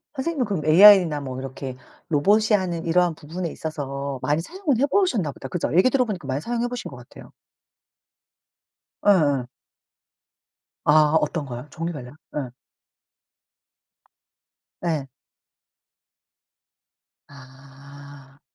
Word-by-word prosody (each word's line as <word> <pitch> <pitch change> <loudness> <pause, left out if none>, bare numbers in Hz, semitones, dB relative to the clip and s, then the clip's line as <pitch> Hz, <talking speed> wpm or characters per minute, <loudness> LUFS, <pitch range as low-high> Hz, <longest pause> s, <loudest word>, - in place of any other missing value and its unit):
선생님은 275 -1 -1
그럼 190 -8 -3
에이아이나 170 -2 +7
뭐 130 -1 -6
이렇게 130 -1 -7 0.3
로봇이 205 +9 +3
하는 175 -3 -4
이러한 175 0 +2
부분에 165 +3 -6
있어서 140 -4 -5
많이 150 +2 0
사용을 330 - -2
해보셨나 275 - +1
보다. 135 - -9
그죠. 175 +4 -3
얘기 190 +8 +5
들어보니까 225 - -1
많이 135 +1 -2
사용해 240 +5 -2
보신 245 -1 -6
것 135 - -10
같아요. 120 0 -14 1.7
예예. 145 -10 +3 1.4
아 150 0 +4
어떤 150 0 -2
거요? 125 +1 -8
종류별로요. 155 -6 -6 0.2
예. 130 -4 -4 2.3
예. 155 -5 -1 2.2
아. 140 +1 -15
155 Hz, 245 characters per minute, -23 LUFS, 140-195 Hz, 2.3 s, 에이아이나